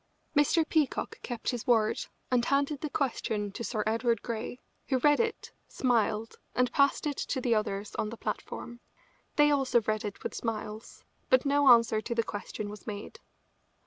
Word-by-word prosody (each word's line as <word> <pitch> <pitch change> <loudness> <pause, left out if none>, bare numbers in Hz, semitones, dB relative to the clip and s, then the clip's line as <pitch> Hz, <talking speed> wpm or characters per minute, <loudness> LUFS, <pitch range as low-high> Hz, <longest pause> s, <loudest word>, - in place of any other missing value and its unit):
Mr. 310 +2 +4
Peacock 310 -4 0
kept 240 0 -3
his 245 -3 -5
word 225 -3 +3 0.3
and 245 -2 +3
handed 280 0 +1
the 305 - -2
question 220 -7 -1
to 235 - -6
Sir 215 -2 -1
Edward 230 0 +1
Grey, 235 +1 -4 0.3
who 265 - +2
read 290 +3 +4
it, 450 -1 -1 0.2
smiled, 225 -3 0 0.2
and 250 -1 +2
passed 280 +1 +3
it 290 -2 -1
to 265 - -2
the 245 -2 +1
others 210 -1 -1
on 210 - -1
the 230 - -8
platform. 240 +1 -5 0.6
They 295 0 +5
also 270 -4 +3
read 215 0 -1
it 205 -2 -6
with - - -3
smiles, 220 -1 -5 0.3
but 255 +1 +4
no 285 0 +3
answer 230 -2 +5
to 235 +1 -4
the 230 - +2
question 205 0 -5
was 210 +2 -10
made. 210 - -6
235 Hz, 175 wpm, -30 LUFS, 215-275 Hz, 0.6 s, They